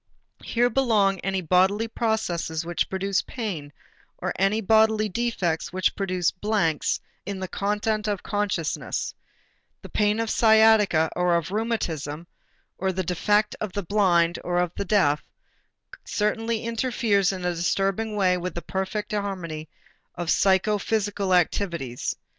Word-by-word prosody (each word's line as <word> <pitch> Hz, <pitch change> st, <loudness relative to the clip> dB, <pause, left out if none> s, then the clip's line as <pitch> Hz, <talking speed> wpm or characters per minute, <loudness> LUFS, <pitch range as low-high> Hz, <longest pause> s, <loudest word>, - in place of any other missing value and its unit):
Here 245 Hz, +1 st, +1 dB
belong 215 Hz, -7 st, +2 dB
any 190 Hz, +1 st, -1 dB
bodily 190 Hz, +6 st, +2 dB
processes 185 Hz, -8 st, -1 dB
which 170 Hz, -2 st, -1 dB
produce 195 Hz, +1 st, 0 dB
pain 185 Hz, -, -5 dB, 0.5 s
or -, -, -3 dB
any 195 Hz, +3 st, +2 dB
bodily 220 Hz, 0 st, +3 dB
defects 185 Hz, -7 st, -1 dB
which 185 Hz, 0 st, 0 dB
produce 185 Hz, -3 st, 0 dB
blanks 180 Hz, -6 st, 0 dB, 0.2 s
in 200 Hz, 0 st, -5 dB
the 190 Hz, -, -4 dB
content 210 Hz, +2 st, -1 dB
of 205 Hz, -3 st, -2 dB
consciousness; 205 Hz, -6 st, -2 dB, 0.7 s
the -, -, -9 dB
pain 210 Hz, +1 st, +1 dB
of 230 Hz, -1 st, -1 dB
sciatica 220 Hz, -7 st, +5 dB
or 180 Hz, -1 st, +2 dB
of 170 Hz, +1 st, -1 dB
rheumatism, 170 Hz, -9 st, -2 dB, 0.5 s
or 190 Hz, 0 st, 0 dB
the 185 Hz, 0 st, -2 dB
defect 205 Hz, +5 st, +1 dB
of 210 Hz, -3 st, -3 dB
the 200 Hz, -, -2 dB
blind 175 Hz, -3 st, +2 dB
or 175 Hz, 0 st, -1 dB
of 180 Hz, -1 st, +1 dB
the -, -, -3 dB
deaf, 175 Hz, -8 st, +2 dB, 0.8 s
certainly 225 Hz, +2 st, -1 dB
interferes 230 Hz, -4 st, +1 dB
in 185 Hz, -2 st, -5 dB
a 180 Hz, -, +1 dB
disturbing 195 Hz, +5 st, 0 dB
way 185 Hz, -3 st, +3 dB
with 180 Hz, +1 st, -5 dB
the 170 Hz, -, -5 dB
perfect 190 Hz, +4 st, -3 dB
harmony 175 Hz, -7 st, -4 dB, 0.5 s
of 175 Hz, -1 st, -2 dB
psychophysical 205 Hz, 0 st, +1 dB
activities. 170 Hz, -8 st, 0 dB
195 Hz, 135 wpm, -25 LUFS, 175-215 Hz, 0.8 s, sciatica